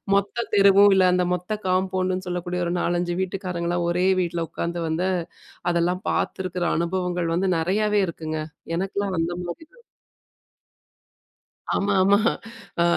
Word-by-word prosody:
மொத்த 200 Hz, +4 st, 0 dB
தெருவும், 200 Hz, 0 st, +7 dB
இல்ல 185 Hz, -, +5 dB
அந்த 180 Hz, 0 st, +2 dB
மொத்த 180 Hz, +2 st, -4 dB, 0.2 s
காம்பவுண்டுன்னு 185 Hz, 0 st, 0 dB
சொல்லக்கூடிய, 180 Hz, 0 st, -3 dB
ஒரு 170 Hz, -, -1 dB
4,5 175 Hz, 0 st, 0 dB
வீட்டுக்காரங்கலாம் 175 Hz, -2 st, -2 dB
ஒரே 180 Hz, +2 st, +1 dB
வீட்டில 170 Hz, -1 st, -2 dB
உட்காந்து 170 Hz, 0 st, -3 dB
வந்து, 175 Hz, +4 st, 0 dB, 0.6 s
அதெல்லாம் 175 Hz, +2 st, 0 dB
பார்த்துருக்கிற 185 Hz, -1 st, -2 dB
அனுபவங்கள் 175 Hz, 0 st, -1 dB
வந்து 185 Hz, +3 st, +1 dB
நிறையாவே 205 Hz, +5 st, +1 dB
இருக்குங்க. 155 Hz, -1 st, -4 dB, 0.4 s
எனக்கெல்லாம் 195 Hz, +1 st, -2 dB
அந்த 165 Hz, +1 st, 0 dB
மாரிதான். 320 Hz, -, -9 dB, 1.9 s
ஆமா, 200 Hz, 0 st, +1 dB
ஆமா. 200 Hz, +1 st, +5 dB, 0.6 s
ஆ -, -, +5 dB
180 Hz, 120 wpm, -24 LUFS, 175-190 Hz, 1.9 s, தெருவும்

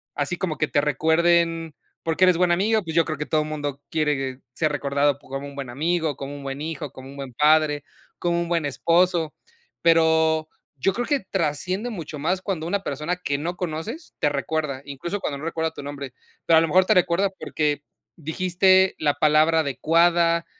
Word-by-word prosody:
así 150 Hz, +5 st, -1 dB
como 170 Hz, -5 st, -2 dB
que 155 Hz, -, 0 dB
te 145 Hz, -, +2 dB
recuerden, 165 Hz, +2 st, +2 dB, 0.3 s
porque 165 Hz, +2 st, +1 dB
eres 185 Hz, -1 st, +5 dB
buen 180 Hz, -1 st, +3 dB
amigo. 210 Hz, +4 st, +2 dB
Pues 160 Hz, -1 st, -6 dB
yo 165 Hz, -1 st, +4 dB
creo 155 Hz, -2 st, -3 dB
que 150 Hz, -, -2 dB
todo 155 Hz, -1 st, +1 dB
mundo, 145 Hz, -2 st, -4 dB
quiere 135 Hz, -4 st, -1 dB
ser 155 Hz, -2 st, 0 dB
recordado 140 Hz, 0 st, +1 dB
p -, -, -20 dB
como 135 Hz, +1 st, -5 dB
un 140 Hz, -, -10 dB
buen 135 Hz, -3 st, -6 dB
amigo, 160 Hz, +3 st, -1 dB
como 140 Hz, +1 st, -6 dB
un 145 Hz, -, -8 dB
buen 135 Hz, +1 st, -5 dB
hijo, 155 Hz, -3 st, -5 dB
como 130 Hz, 0 st, -11 dB
un 140 Hz, -, -11 dB
buen 135 Hz, -3 st, -7 dB
padre, 150 Hz, +1 st, +3 dB, 0.4 s
como 170 Hz, 0 st, 0 dB
un 170 Hz, -, -4 dB
buen 165 Hz, -3 st, +1 dB
esposo. 170 Hz, +3 st, +2 dB, 0.5 s
Pero, 160 Hz, -1 st, +3 dB, 0.3 s
yo 195 Hz, +8 st, +2 dB
creo 245 Hz, +2 st, -2 dB
que 290 Hz, -2 st, +2 dB
trasciende 185 Hz, +4 st, -2 dB
mucho 165 Hz, -7 st, -6 dB
más, 180 Hz, +6 st, 0 dB
cuando 180 Hz, -5 st, -3 dB
una 200 Hz, +3 st, 0 dB
persona 150 Hz, +6 st, -3 dB
que 140 Hz, -6 st, -2 dB
no 175 Hz, +4 st, -3 dB
conoces, 180 Hz, -, -5 dB
te 150 Hz, -, +2 dB
recuerda, 145 Hz, -1 st, -2 dB
incluso, 145 Hz, +8 st, -4 dB
cuando 140 Hz, -, -3 dB
no 155 Hz, -, -7 dB
recuerda 160 Hz, -1 st, -1 dB
tu 145 Hz, -, -9 dB
nombre. 140 Hz, -3 st, -7 dB, 0.3 s
Pero 165 Hz, -, +6 dB
a -, -, +3 dB
lo 165 Hz, -, +1 dB
mejor 185 Hz, +4 st, +4 dB
te -, -, +4 dB
recuerda, 180 Hz, +2 st, +3 dB
porque 150 Hz, -1 st, -1 dB, 0.3 s
dijiste 185 Hz, +4 st, +3 dB
la 145 Hz, -2 st, +2 dB
palabra 155 Hz, +1 st, +4 dB
adecuada. 170 Hz, +4 st, +2 dB
160 Hz, 195 wpm, -24 LUFS, 145-175 Hz, 0.5 s, Pero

